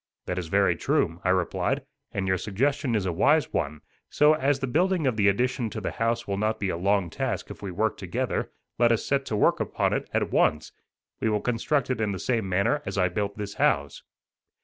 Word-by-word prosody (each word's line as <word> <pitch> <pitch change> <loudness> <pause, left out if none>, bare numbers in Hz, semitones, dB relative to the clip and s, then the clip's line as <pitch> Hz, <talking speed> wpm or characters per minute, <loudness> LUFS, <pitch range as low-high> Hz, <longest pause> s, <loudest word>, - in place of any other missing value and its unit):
"That 90 0 -2
is 85 - -5
very - - +3
true," 85 +1 0
I - - +1
replied, 90 -2 0 0.3
"and 95 -1 -2
your 95 -1 +1
suggestion 130 - 0
is 100 -3 0
a 90 - -1
wise 145 - +3
one; 75 0 -2 0.3
so, 150 +1 +5
as 145 -2 +1
the 135 - -1
building 175 +5 +1
of 130 -4 +1
the 105 -2 +3
addition 120 +3 +1
to 110 - -5
the 100 - -3
house 115 +1 -1
will 100 -1 -2
not 110 +1 0
be 100 - -1
a - - -1
long 95 0 +1
task - - -3
if - - -10
we 100 - -5
work 105 +5 -1
together, 90 -3 -2 0.3
let 120 -1 +5
us 115 - +1
set 135 -1 0
to 110 - -2
work 105 - +3
upon - - 0
it - - -2
at - - 0
once. 75 0 +2 0.5
We 110 - +1
will 105 -1 +1
construct 125 +4 0
it 120 -3 -1
in 105 -2 0
the - - -4
same 110 -1 -1
manner 100 +11 +1
as - - -5
I 90 -1 +3
built 100 +2 -3
this 100 -1 -5
house." 70 0 +1
105 Hz, 225 wpm, -26 LUFS, 95-125 Hz, 0.5 s, so